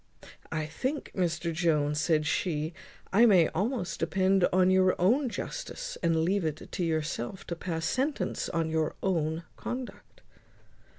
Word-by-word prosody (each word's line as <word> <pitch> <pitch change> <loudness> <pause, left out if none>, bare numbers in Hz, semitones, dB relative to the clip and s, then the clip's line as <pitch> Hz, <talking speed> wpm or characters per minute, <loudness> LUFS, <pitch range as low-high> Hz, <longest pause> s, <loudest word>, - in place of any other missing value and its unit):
"I 155 -1 -1
think, 260 - -3
Mr 170 -2 -1
Jones," 150 -3 +1
said 155 -2 +2
she, 155 0 -1 0.4
"I 230 +4 +7
may 185 -6 +5
almost 195 -1 -2
depend 190 -1 +3
on 185 0 +4
your 185 0 +3
own 245 +9 +3
justice, - - -5
and 165 -2 +2
leave 190 +3 +1
it 155 -1 -4
to 180 - -2
yourself 160 0 -2
to 170 - -4
pass 165 -1 -3
sentence 275 +3 -1
on 165 -2 -1
your 160 -1 0
own 165 -3 0
conduct." 255 - -7
175 Hz, 140 wpm, -29 LUFS, 160-195 Hz, 0.4 s, I